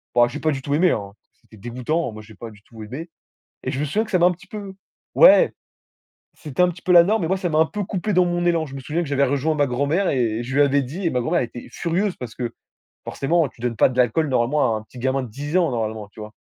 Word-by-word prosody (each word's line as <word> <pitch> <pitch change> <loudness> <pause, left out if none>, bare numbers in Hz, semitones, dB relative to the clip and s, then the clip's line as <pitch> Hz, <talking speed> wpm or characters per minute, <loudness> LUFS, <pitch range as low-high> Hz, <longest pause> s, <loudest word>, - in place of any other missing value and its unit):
Bon, 120 0 +5
j'ai 150 - -6
pas 155 - +1
du 135 - -4
tout 140 +2 -3
aimé, 175 +3 +4
hein, 100 -1 -3 0.3
c'était 110 - -18
dégoûtant, 125 +7 -2
moi, 110 0 -9
j'ai 110 -1 -15
pas 115 +2 -9
du 105 - -18
tout 110 -2 -12
aimé. 135 +10 -7 0.5
Et - - -2
je 135 - -3
me 150 - 0
souviens 210 +10 0
que 215 - -12
ça 185 - +3
m'a 170 - +5
un - - +3
petit 180 - -11
peu 200 -2 -7 0.4
ouais, - - +7 0.8
c'était 150 +1 -3
un 180 - +4
petit 175 0 -9
peu 185 - 0
la 170 -1 +9
norme 215 +2 +1
mais - - 0
moi, 190 - +2
ça 180 -2 -2
m'a 155 - 0
un 160 - +5
peu 210 -1 -4
coupé 195 +1 -3
dans 180 0 +5
mon 175 0 -1
élan. 165 -2 +2
Je 135 - -11
me 135 - -5
souviens 165 +6 -2
que 145 - -7
j'avais 140 0 +2
rejoint 140 +4 0
ma 145 -2 +2
grand 125 +3 -1
mère 180 +6 +1
et 120 -3 0
je 130 +2 -5
lui 145 - +5
avais 140 0 +3
dit 165 +10 -6
et 170 - +3
ma 125 - 0
grand 155 - -3
mère 175 - +3
elle 120 - -2
était 120 - -10
furieuse 180 +3 -1
parce 120 -4 -8
que 120 -2 -4 0.5
forcément, 160 +1 0
tu 115 - -21
donnes 120 -2 -2
pas - - +5
de 125 - -8
l'alcool 125 +6 +2
normalement 125 -1 +1
à - - -2
un 110 - -10
petit 125 +3 -15
gamin 130 +2 0
de 125 - -6
10 145 +9 -4
ans, 170 -5 +3
normalement, 110 -3 -3
tu 105 - -22
vois? 105 0 -8
140 Hz, 300 wpm, -22 LUFS, 120-175 Hz, 0.8 s, la